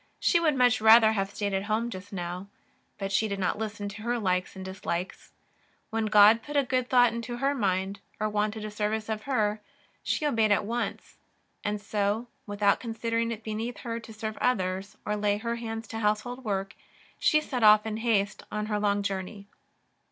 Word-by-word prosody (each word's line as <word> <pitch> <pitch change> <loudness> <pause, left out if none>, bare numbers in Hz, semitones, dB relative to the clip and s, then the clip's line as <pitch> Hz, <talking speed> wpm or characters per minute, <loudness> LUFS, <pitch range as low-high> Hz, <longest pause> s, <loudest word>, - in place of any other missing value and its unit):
She 345 - +3
would 315 -4 +2
much 250 -2 +3
rather 220 0 +8
have 195 -3 -1
stayed 200 0 -3
at 195 +1 -1
home 225 +3 -1
just 195 0 -8
now, 180 0 -5 0.5
but 195 -1 -4
she 220 +3 +2
did 200 -1 -3
not 190 +2 -1
listen 210 -2 -4
to 220 +4 -3
likes 185 -2 -1
and 190 0 -7
dislikes; 190 -1 -5 0.6
when 225 0 0
God 210 +2 +7
put 295 +4 -4
a 285 - +4
good 255 -1 -1
thought 245 -2 +5
into 235 +1 -4
her 275 +3 +1
mind, 195 -4 -1 0.2
or 215 - +1
wanted 210 +1 -1
a 215 - -5
service 215 +1 -2
of 215 -1 -2
her, 215 -4 +1 0.4
she 305 - -1
obeyed 225 -7 +2
at 205 - +3
onc^. 235 +4 -4 0.5
And 205 0 -1
so, 205 +2 -1 0.2
w^ithout 205 0 +2
considering 230 0 -2
it 225 -1 -6
beneath 220 +3 -4
her 230 -1 -4
to 225 -1 -12
serve 215 0 -5
others, 190 -4 -1
or 210 - 0
lay 205 -1 +1
her 235 +2 -3
hands 225 -1 -5
to 225 - -4
household 225 +4 -1
work, 195 -3 -2 0.5
she 305 - +4
set 265 -5 -4
off 210 0 +7
in 220 -1 -3
haste 215 -3 0
on 210 0 -2
her 210 -1 -1
long 205 -1 +1
journey. 200 +1 -4
215 Hz, 190 wpm, -28 LUFS, 200-230 Hz, 0.6 s, rather